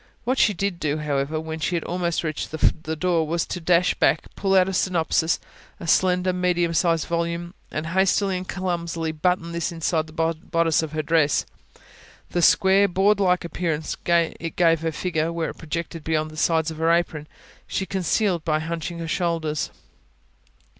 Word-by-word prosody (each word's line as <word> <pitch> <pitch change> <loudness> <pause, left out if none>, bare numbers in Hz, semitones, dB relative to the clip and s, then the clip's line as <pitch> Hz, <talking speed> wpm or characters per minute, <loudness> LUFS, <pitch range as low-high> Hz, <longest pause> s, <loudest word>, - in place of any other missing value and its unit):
What 255 +3 0
she 210 - +4
did 195 -1 -2
do, 150 0 -1
however, 150 0 -1
when 160 0 -5
she 175 +3 -1
had 165 - -1
almost 175 -1 -1
reached 155 -2 -3
the 160 0 0
door, 165 -1 +1
was 170 +2 0
to 180 - -5
dash 175 +2 +3
back, - - +1
pull 195 -1 +1
out 185 -1 +5
a 190 - -2
synopsis 165 -3 +1
[P.262] - - -29 0.3
a - - -7
slender, 180 +1 +3
medium 175 -2 +1
sized 165 -1 +2
volume 170 +1 -2 0.2
and 155 - -4
hastily 190 +2 +2
and 180 0 -4
clumsily 170 -3 -2
button 170 +2 0
this 170 0 -2
inside 165 -1 -1
the 155 - -14 0.3
bodice 165 -3 +1
of 160 -1 -5
her 155 0 -1
dress. 155 -2 +2 0.9
The 175 - 0
square, 195 +3 +5
board 195 +3 +2
like 180 -3 +2
appearance 165 -3 -2
it 170 -1 +1
gave 165 -2 +3
her 165 0 -1
figure, 160 -1 -1
where 170 -1 -2
it - - -16
projected 165 0 -5
beyond 155 -1 -1
the - - -11
sides 160 0 +1
of 160 - -8
her 165 0 +2
apron, 165 -3 0 0.4
she 190 - -2
concealed 190 -1 0
by 155 -1 +1
hunching 165 +1 -4
her 165 -1 -5
shoulders. 160 -3 -1
170 Hz, 180 wpm, -24 LUFS, 160-180 Hz, 0.9 s, out